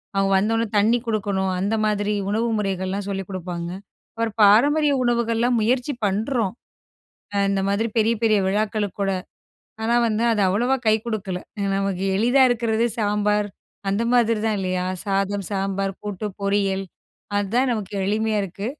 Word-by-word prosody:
அவங்க 195 0 +2
வந்த 205 +4 +1
உடனே 225 -1 0
தண்ணி 225 +4 +4
குடுக்கணும். 200 -3 0
அந்த 200 +4 0
மாதிரி 210 0 0 0.2
உணவு 220 +3 0
முறைகள்லாம் 195 0 -2
சொல்லிக் 195 -1 -4
குடுப்பாங்க. 175 -2 -5 0.5
ஒரு 230 - +1
பாரம்பரிய 285 +9 +5
உணவுகள்லாம் 235 0 +1
முயற்சி 250 +5 +1
பண்றோம். 220 +1 0 0.8
அ - - -1
இந்த 195 -1 +1
மாதிரி 205 +3 +1
பெரிய 225 +1 +3
பெரிய 215 -2 +4
விழாக்களுக்கூட. 205 -1 -1 0.7
ஆனா, 230 +2 +1
வந்து 220 +1 0
அது 215 - 0
அவ்வளோவா 240 +8 +2
கை 215 - +5
குடுக்கல.ஏனா 200 -1 -4
நமக்கு 195 -1 -1
எளிதா 245 +5 +4
இருக்கிறதே 230 -1 +1
சாம்பார் 210 -1 +1 0.4
அந்த 200 +3 +1
மாதிரிதான் 225 -2 +2
இல்லையா? 185 -1 -1 0.2
சாதம், 195 0 -1
சாம்பார், 195 0 -1
கூட்டு, 205 0 -4 0.2
பொரியல் 200 -1 +1 0.5
அதான் 230 +6 +1
நமக்கு 215 -4 -4
எளிமையா 215 +2 0
இருக்கு. 195 +2 -5
210 Hz, 135 wpm, -23 LUFS, 195-225 Hz, 0.8 s, பாரம்பரிய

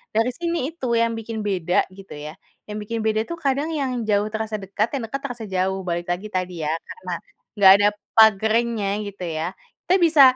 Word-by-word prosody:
dari 225 +3 +3
sini 335 -1 -2
itu 255 -8 -2
yang 230 0 +1
bikin 225 -1 -5
beda 185 -4 +1
gitu 195 -1 -11
ya, 150 +5 -8 0.2
yang 210 0 -6
bikin 220 +2 -3
beda 220 0 +1
tuh 340 - -4
kadang 285 -2 0
yang 275 -3 -1 0.2
jauh, 210 0 +2
terasa 220 0 -2
dekat; 200 +1 -1
yang 265 - -2
dekat, 225 +5 -4
terasa 245 -4 -6
jauh. 190 -1 -1
Balik 175 0 -2
lagi 180 +4 -3
tadi 180 -3 -3
ya, 150 - 0
karena 455 - -9 0.5
enggak 190 -1 +9
ada - - +7 0.3
pagernya 220 0 +4 0.2
gitu 200 -2 -7
ya. 160 -1 -2 0.4
Kita 365 - +5
bisa, 320 -3 +6
215 Hz, 190 wpm, -23 LUFS, 190-235 Hz, 0.5 s, enggak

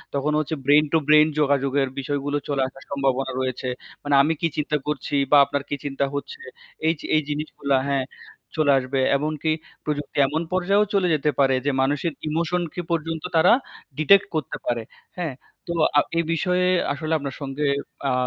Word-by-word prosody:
তখন 145 +2 0
হচ্ছে 155 +1 -2
brain 150 +2 +5
two - - +6
brain 155 0 +7
যোগাযোগের 140 -1 +2
বিষয়গুলো 145 +1 -2
চলে 140 -1 0
আসার 135 +1 -13
সম্ভাবনা 135 -1 0
রয়েছে। 130 0 -2 0.4
মানে 145 -1 +2
আমি 155 +3 +2
কি 165 - +3
চিন্তা 150 0 0
করছি 150 0 -2 0.2
বা 145 - +8
আপনার 140 0 -3
কি 145 - -1
চিন্তা 140 0 -1
হচ্ছে, 460 - -6 0.5
এইযে 160 -2 -1
এই 155 - +4
জিনিসগুলা 145 -2 -1
হ্যাঁ 135 -2 +1 0.5
চলে 150 -2 +4
আসবে। 130 +1 -2 0.2
এমনকি 155 +1 -1 0.3
প্রযুক্তি 145 -1 -4
এমন 155 +4 -1
পর্যায়েও 195 +3 +3
চলে 190 -2 +3
যেতে 150 +1 +1
পারে 135 -1 +4
যে 145 - +2
মানুষের 145 +4 0
ইমোশন 170 +3 0
কে 175 - -3
পর্যন্ত 165 -1 -2
তারা 160 - +6 0.4
ডিটেক্ট 195 +6 +5
করতে 155 -5 -2
পারে, 120 -2 -1 0.3
হ্যাঁ? 165 -6 -2 0.3
তো 170 - -2 0.2
আ - - +9 0.2
এই 170 - +3
বিষয়ে 180 +2 +1 0.3
আসলে 155 +2 -3
আপনার 140 -3 -5
সঙ্গে 140 +1 -2 0.4
আ - - +1
145 Hz, 170 wpm, -23 LUFS, 140-160 Hz, 0.5 s, আ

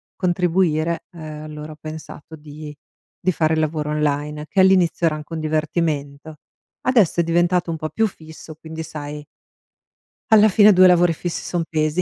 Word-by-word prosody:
contribuire, 175 -2 0
ehm, 155 -3 -9
allora 150 0 -8
ho - - -17
pensato 155 0 -9
di 150 0 -10 0.5
di 185 - +2
fare 160 -1 +1
lavoro 155 -1 -1
online, 150 0 -2
che 190 - +2
all'inizio 185 -3 +3
era 160 - 0
anche 155 +2 -9
un 160 - -3
divertimento. 155 -1 -2 0.5
Adesso 215 -9 +3
è - - 0
diventato 175 +1 +1
un 165 - -3
po' 155 0 -4
più 225 +5 +1
fisso, 160 -3 -12
quindi 160 +1 -8
sai 150 -1 -7 1.1
alla 215 0 +7
fine 205 +1 +6
2 185 0 +7
lavori 175 -1 +4
fissi 170 +1 -5
son 175 -2 -2
pesi, 155 +2 0
160 Hz, 160 wpm, -21 LUFS, 155-175 Hz, 1.1 s, alla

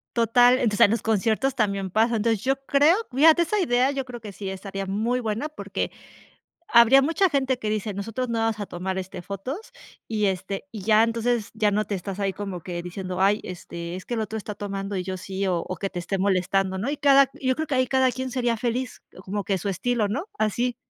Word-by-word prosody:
Total, 245 +1 +5
entonces 215 -5 0
en 205 - +1
los 225 -2 0
conciertos 225 +5 +1
también 200 -4 0
pasa. 225 +5 +2
Entonces, 220 -1 +1
yo 270 +1 +1
creo 290 +5 +5 0.2
fíjate 315 +5 +6
esa 375 +5 +1
idea, 255 -6 +2
yo 275 -2 -3
creo 245 -2 -9
que 210 -2 -8
sí 195 0 -6
estaría 195 +1 -5
muy 220 +6 0
buena 230 +5 -2
porque, 305 - -4 0.8
habría 235 +3 +8
mucha 330 +7 +2
gente 265 -3 +1
que 215 -4 -3
dice: 215 -1 -2
"Nosotros 225 +6 -3
no 230 -1 -1
vamos 225 -1 0
a 205 - -3
tomar, 185 +2 -4
este, 185 -1 -6
fotos" 260 - -6 0.4
y 215 -2 0
este 190 +6 -3
y 215 -4 -7
ya 215 +2 +5
entonces 230 -1 -1
ya 215 -2 +2
no 210 +1 0
te 205 - -3
estás 195 +1 -5
ahí 195 -1 0
como 195 -3 -5
que 175 0 -5
diciendo: 180 +1 -5
"Ay, 205 +2 +3
este, 170 -1 -7
es 185 - -8
que - - -7
el 230 - 0
otro 220 0 -3
está 210 -1 -5
tomando 200 0 -4
y 185 - -1
yo 190 0 -4
sí", 190 +1 -4
o 180 -2 +1
o 185 - -4
que 195 +4 -3
esté 180 +2 -2
molestando, 190 0 +1
¿no? 215 +9 -2
Y 295 - -3
cada 275 -1 +6
q - - -18
y 260 - -2
yo 260 - +3
creo 315 +4 -3
que 285 -3 -1
ahí 255 0 +3
cada 260 0 +3
quien 260 +1 -4
sería 240 -2 0
feliz 245 +2 -3 0.2
como 200 +1 -3
que 195 - 0
a - - 0
su 200 +3 -2
estilo, 230 +3 0
¿no? 220 - -3
Así. 235 +3 0
215 Hz, 235 wpm, -25 LUFS, 195-250 Hz, 0.8 s, habría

